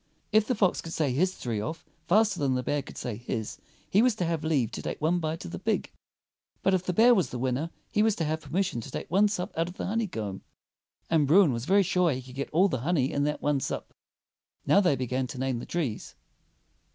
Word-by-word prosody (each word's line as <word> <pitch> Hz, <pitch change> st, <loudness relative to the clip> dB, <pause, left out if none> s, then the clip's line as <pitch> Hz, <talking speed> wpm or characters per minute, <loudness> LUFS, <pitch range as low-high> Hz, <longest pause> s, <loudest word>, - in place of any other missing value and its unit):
If 215 Hz, 0 st, +4 dB
the 255 Hz, -, +1 dB
fox 195 Hz, -4 st, +2 dB
could 165 Hz, -, -7 dB
say 145 Hz, -5 st, 0 dB
his 185 Hz, +7 st, +1 dB
three 115 Hz, -4 st, -3 dB
off 160 Hz, +10 st, -5 dB, 0.2 s
faster 205 Hz, -1 st, +3 dB
than 135 Hz, -3 st, +1 dB
the 125 Hz, -, -1 dB
bear 145 Hz, +3 st, 0 dB
could 135 Hz, -, -12 dB
say 120 Hz, -4 st, -4 dB
his, 115 Hz, -2 st, -4 dB, 0.3 s
he 200 Hz, -, +4 dB
was 245 Hz, -2 st, +3 dB
to 180 Hz, -, -1 dB
have 165 Hz, -2 st, -1 dB
leave 140 Hz, -8 st, +1 dB
to -, -, -5 dB
take -, -, -4 dB
one 165 Hz, +3 st, +1 dB
bite 160 Hz, 0 st, -3 dB
of 85 Hz, -, -7 dB
the 85 Hz, -, -5 dB
pig. -, -, -1 dB, 0.7 s
But 195 Hz, -, +3 dB
if 185 Hz, -, +2 dB
the -, -, +2 dB
bear 230 Hz, +7 st, +6 dB
was 190 Hz, -7 st, +2 dB
the 125 Hz, -, -5 dB
winner 130 Hz, +6 st, -1 dB, 0.2 s
he 210 Hz, -, +2 dB
was 220 Hz, -1 st, +3 dB
to 165 Hz, -, -2 dB
have 155 Hz, +1 st, -2 dB
permis 170 Hz, +7 st, 0 dB
sion 120 Hz, -, -3 dB
to 115 Hz, -, -9 dB
take -, -, -6 dB
one 200 Hz, +4 st, +5 dB
sup 200 Hz, -3 st, -3 dB
out 165 Hz, +1 st, 0 dB
of 180 Hz, -, -9 dB
the -, -, -3 dB
honeycomb; 165 Hz, -, -3 dB, 0.7 s
and 155 Hz, -4 st, +3 dB
Bruin 165 Hz, -2 st, +6 dB
was 115 Hz, +1 st, -3 dB
very 200 Hz, +4 st, +4 dB
sure 180 Hz, -1 st, +2 dB
he 130 Hz, 0 st, -5 dB
could 125 Hz, 0 st, -12 dB
get 140 Hz, +1 st, -4 dB
all 180 Hz, +5 st, +4 dB
the 130 Hz, -, -2 dB
honey 140 Hz, -1 st, +1 dB
in 140 Hz, 0 st, 0 dB
that 150 Hz, 0 st, -2 dB
one 145 Hz, -1 st, +2 dB
sup. -, -, -4 dB, 0.7 s
Now -, -, +5 dB
they 175 Hz, -7 st, +3 dB
began 130 Hz, 0 st, -2 dB
to 130 Hz, -, -8 dB
name 130 Hz, -2 st, -1 dB
the -, -, -8 dB
trees. 145 Hz, -11 st, -3 dB
155 Hz, 250 wpm, -28 LUFS, 130-185 Hz, 0.7 s, bear